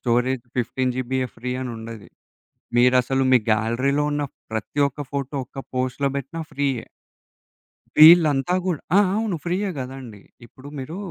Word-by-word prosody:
Storage 125 +1 0
15 130 +1 -1 0.2
free 125 +2 -5
అని 125 - -4
ఉండది. 110 -2 -9 0.7
మీరసలు 125 +2 +3
మీ 130 - +8
గ్యాలరీలో 120 +6 +1
ఉన్న 145 0 -1 0.3
ప్రతి 110 +6 -4
ఒక్క 140 +2 -7
ఫోటో 140 0 -4
ఒక్క 135 - -18 0.2
పోస్ట్‌లో 130 +2 -1
పెట్టినా 140 +4 -4
ఫ్రీయే. 135 -4 -1 1.1
వీళ్ళంతా 155 -1 +7
గూడా 175 -6 -1 0.2
ఆ! - - +8 0.2
అవును 220 -4 -1
ఫ్రీయే 190 +4 -1
గదండీ. 125 -5 -8 0.2
ఇప్పుడు 130 +4 -15
మీరు, 155 +7 -6
130 Hz, 130 wpm, -23 LUFS, 125-145 Hz, 1.1 s, మీ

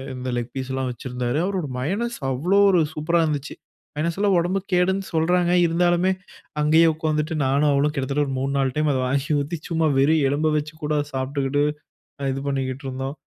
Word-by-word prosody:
இந்த 125 0 -5
லெக் 120 0 -4
பீஸ்லாம் 130 0 -2
வச்சிருந்தாரு. 125 +2 -3
அவரோட 185 -7 -2
மயனஸ் 220 - -2
அவ்ளோ 180 +10 +2
ஒரு 175 -3 +4
சூப்பரா 165 +2 +1
இருந்துச்சு. 150 -2 -3 0.4
மையனஸ்ல்லாம் 180 +5 +1
உடம்புக்கு 190 +3 -2
கேடுன்னு 190 +2 +2
சொல்றாங்க. 175 +2 +2
இருந்தாலுமே, 175 +2 +2 0.5
அங்கயே 160 +2 +5
உக்காந்துட்டு 155 0 -1
நானும் 140 +3 +2
அவளும் 145 +2 +1
கிட்டத்தட்ட, 140 +2 0
ஒரு 135 - -3
மூணு 135 +1 -1
நாலு 135 -1 +1
டைம் 150 -1 +1
அத 130 - 0
வாங்கி 140 +4 -1
ஊத்தி, 160 +4 -4
சும்மா 160 -1 +1
வெறும் 150 +2 +3
எலும்ப 150 +3 0
வச்சு 155 +1 -4
கூட 150 +1 -1
அதை 145 - -3
சாப்ட்டுக்குட்டு, 135 +1 0 0.7
இது 135 - -4
பண்ணிக்கிட்ருந்தோம். 135 0 -3
150 Hz, 165 wpm, -23 LUFS, 135-170 Hz, 0.7 s, அங்கயே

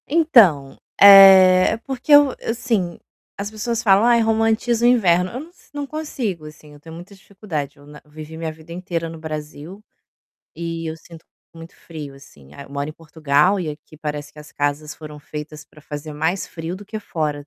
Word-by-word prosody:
Então, 220 - +3 0.2
eh, 190 -2 +8
é - - -3
porque 265 +4 -6
eu 290 -2 +6
eu, 225 - -3
sim, 215 -8 -2 0.4
as 200 +1 -5
pessoas 225 +2 -3
falam: 200 +1 +4
"Ai, 240 -1 +4
romantiza 225 +1 0
o - - +6
inverno". 185 -7 +2
Eu 250 - -6
não 320 +5 -11
sin - - -26
não 290 -1 -5
consigo 250 - -5
assim, 150 -1 -15
eu 145 - -16
tenho 160 +2 -13
muita 180 +4 -12
dificuldade. 185 -8 -7
Eu 145 - -18
na 150 0 -14
eu 150 - -27
vivi 155 +1 -10
minha 165 -1 -4
vida 160 +1 -13
inteira 170 -2 -5
no 165 - -10
Brasil, 155 +4 -8 0.7
e 165 -1 -5
eu 160 - -6
sinto 165 0 -16 0.3
muito 165 0 -13
frio, 150 -4 -10
assim. 75 - -18
A - - -10
eu 140 - -16
moro 140 +1 -4
em - - -7
Portugal 155 +3 0
e 165 -4 -4
aqui 155 +1 -13
parece 150 -1 -6
que - - -18
as 150 0 -13
casas 145 +1 -3
foram 150 -1 -11
feitas 150 +1 -9
pra 150 0 -20
fazer 150 +1 -8
mais 160 +6 -2
frio 165 +1 -7
do 205 - -12
que 215 +2 -7
fora, 150 -7 -4
165 Hz, 205 wpm, -20 LUFS, 150-205 Hz, 0.7 s, eh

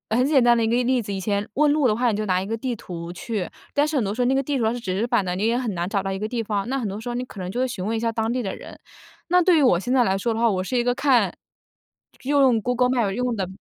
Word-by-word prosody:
很 250 - +3
简 275 -5 +4
单 240 0 +5
的 230 - +1
一 - - +1
个 230 - +1
例 250 0 +1
子， 205 - -6
以 195 - -3
前 200 +1 -1
问 295 +1 +4
路 295 -3 +3
的 215 - +2
话， 245 0 +1
你 - - -1
就 215 - -2
拿 185 -1 +2
一 190 - -4
个 225 - -2
地 245 +2 -3
图 170 -5 -7
去， 205 0 -4 0.2
但 290 +1 +2
是 305 - -3
很 250 - +2
多 200 +1 -2
时 250 - -2
候 - - +2
那 265 +2 +2
个 275 - +1
地 285 +2 -2
图 220 0 +1
是 245 - -4
纸 185 -5 -3
质 230 - 0
版 205 - +1
的， 180 0 -2
你 205 +4 -1
也 235 +1 +1
很 245 -5 -2
难 175 +1 -3
找 200 -1 -1
到 195 - -2
一 190 - -3
个 215 - -2
地 235 0 -3
方， 205 0 -2
那 270 - -1
很 235 - -2
多 200 +2 -5
时 240 - -6
候 240 - -3
你 250 +1 -3
可 210 - -12
能 180 - -4
就 240 - -4
会 260 - +1
询 215 -7 -5
问 220 +3 -1
一 - - -1
下 230 0 0
当 225 0 -1
地 250 0 -1
的 195 - -4
人。 - - -12 0.5
那 360 +1 +5
对 350 -1 +4
于 295 - +3
我 180 -9 +4
现 245 +7 -4
在 255 -2 +4
来 190 -3 +1
说 225 +4 -1
的 225 - -2
话， 235 - +3
我 185 -1 -1
是 245 +6 -2
一 240 - +2
个 245 0 +1
看 245 -7 +2 0.9
用 265 -4 +3
Google 250 +2 +1
Map 235 -6 +1
用 250 +1 -1
的 190 -3 -2
230 Hz, 405 characters per minute, -23 LUFS, 200-250 Hz, 0.9 s, 单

